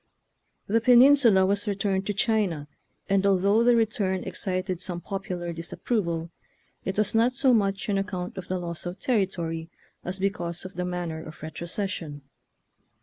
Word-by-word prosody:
The 225 Hz, +3 st, +2 dB
penin 250 Hz, +4 st, +8 dB
sula 220 Hz, -9 st, +5 dB
was 200 Hz, +2 st, 0 dB
returned 195 Hz, -1 st, -1 dB
to 205 Hz, -, 0 dB
China, 200 Hz, -9 st, 0 dB, 0.4 s
and 195 Hz, 0 st, +2 dB
although 200 Hz, +3 st, +3 dB
the 240 Hz, 0 st, +5 dB
return 210 Hz, -5 st, 0 dB
excited 185 Hz, -1 st, -3 dB
some 180 Hz, -2 st, -2 dB
popular 180 Hz, -2 st, -4 dB
disap 165 Hz, 0 st, -8 dB
proval, 170 Hz, -8 st, -1 dB, 0.5 s
it 190 Hz, +1 st, -3 dB
was 215 Hz, -, +2 dB
not 230 Hz, +3 st, +3 dB
so 265 Hz, -1 st, +3 dB
much 195 Hz, -3 st, +1 dB
on 200 Hz, -2 st, +1 dB
account 185 Hz, -2 st, -4 dB
of 190 Hz, -2 st, -7 dB
the 185 Hz, -, -1 dB
loss 170 Hz, -1 st, -5 dB
of 175 Hz, +2 st, -5 dB
territory 170 Hz, -8 st, -1 dB, 0.3 s
as 180 Hz, +2 st, -4 dB
because 185 Hz, -3 st, -2 dB
of 185 Hz, -, -7 dB
the 180 Hz, +1 st, -3 dB
man 180 Hz, -1 st, -3 dB
ner 160 Hz, 0 st, -6 dB
of 155 Hz, -, -11 dB
retrocession. 165 Hz, -1 st, -4 dB
190 Hz, 165 wpm, -26 LUFS, 175-210 Hz, 0.5 s, penin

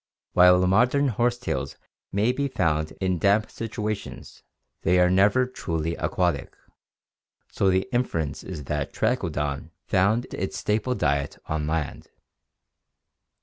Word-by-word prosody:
While 90 Hz, 0 st, +6 dB
modem 125 Hz, +9 st, +3 dB
horsetails 120 Hz, -, -1 dB, 0.4 s
may 105 Hz, +5 st, +2 dB
be 140 Hz, +2 st, -1 dB
found 80 Hz, -, 0 dB
in 95 Hz, -2 st, 0 dB
damp 100 Hz, +5 st, +2 dB
situations, 110 Hz, -2 st, -5 dB, 0.4 s
they 90 Hz, +2 st, +3 dB
are 90 Hz, 0 st, +4 dB
never 100 Hz, +7 st, +4 dB
truly 85 Hz, -10 st, -3 dB
aquatic, 90 Hz, -6 st, -1 dB, 0.9 s
so 95 Hz, -, +2 dB
the 95 Hz, 0 st, +1 dB
inference 80 Hz, -, -1 dB
is 80 Hz, -6 st, -7 dB
that -, -, -3 dB
Trachodon 75 Hz, +1 st, -1 dB, 0.2 s
found 105 Hz, +5 st, +2 dB
its 95 Hz, -, -3 dB
staple 110 Hz, +4 st, 0 dB
diet 70 Hz, -6 st, 0 dB
on 75 Hz, -1 st, -2 dB
land. 80 Hz, -1 st, -3 dB
95 Hz, 115 wpm, -25 LUFS, 80-110 Hz, 0.9 s, While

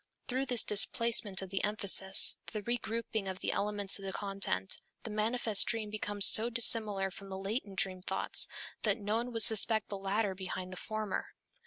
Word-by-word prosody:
Through 260 Hz, +2 st, -3 dB
this 245 Hz, -3 st, +5 dB
displacement 210 Hz, -1 st, +2 dB
of 190 Hz, -, -10 dB
the 195 Hz, -, -3 dB
emphasis, 200 Hz, -2 st, +3 dB
this 215 Hz, -2 st, -7 dB
regrouping 230 Hz, -3 st, -4 dB
of 190 Hz, -1 st, -5 dB
the -, -, -3 dB
elements 205 Hz, -1 st, -1 dB
of -, -, -12 dB
the 190 Hz, -, -4 dB
content, 195 Hz, -, -1 dB, 0.2 s
the 225 Hz, -, -7 dB
manifest 215 Hz, 0 st, +1 dB
dream 220 Hz, -3 st, -2 dB
becomes 205 Hz, -1 st, +1 dB
so 225 Hz, +2 st, +6 dB
dissimilar 215 Hz, -5 st, +2 dB
from 195 Hz, +1 st, -12 dB
the 190 Hz, -, -7 dB
latent 200 Hz, 0 st, -5 dB
dream 185 Hz, -1 st, -1 dB
thoughts -, -, +1 dB, 0.3 s
that 210 Hz, -1 st, 0 dB
no 210 Hz, 0 st, -3 dB
one 240 Hz, +2 st, -4 dB
would 225 Hz, -2 st, +1 dB
suspect 220 Hz, 0 st, +3 dB
the 200 Hz, -, -6 dB
latter 195 Hz, +1 st, -2 dB
behind 185 Hz, 0 st, -7 dB
the -, -, -10 dB
former. 215 Hz, -1 st, -5 dB
210 Hz, 180 wpm, -31 LUFS, 195-225 Hz, 0.3 s, so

